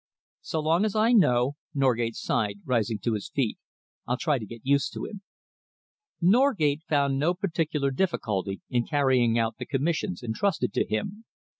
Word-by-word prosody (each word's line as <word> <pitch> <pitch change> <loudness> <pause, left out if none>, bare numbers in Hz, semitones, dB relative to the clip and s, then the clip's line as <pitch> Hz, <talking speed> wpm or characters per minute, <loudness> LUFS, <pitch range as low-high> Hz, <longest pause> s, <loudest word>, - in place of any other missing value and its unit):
"So 160 - -3
long 165 +5 +2
as 215 -1 -1
I 220 +2 +3
know," 135 - +3 0.2
Norgate 120 -4 +1
sighed, 100 -2 -1
rising 115 -3 0
to 115 - +1
his 105 -2 -4
feet, 130 -6 -1 0.5
"I'll 125 - 0
try 150 -4 +1
to 110 - -7
get 115 +1 -10
used 140 +1 +2
to - - -4
him." 205 -3 -8 1.0
Norgate 185 - +3
found 140 -2 +2
no 170 +5 +2
particular 160 -6 -1
difficulty 105 - -1
in 120 -2 -1
carrying 130 -6 +2
out 115 -1 0
the - - -4
commissions 140 - -1
entrusted 130 - -1
to - - 0
him. 195 - -3
140 Hz, 160 wpm, -27 LUFS, 115-170 Hz, 1.0 s, I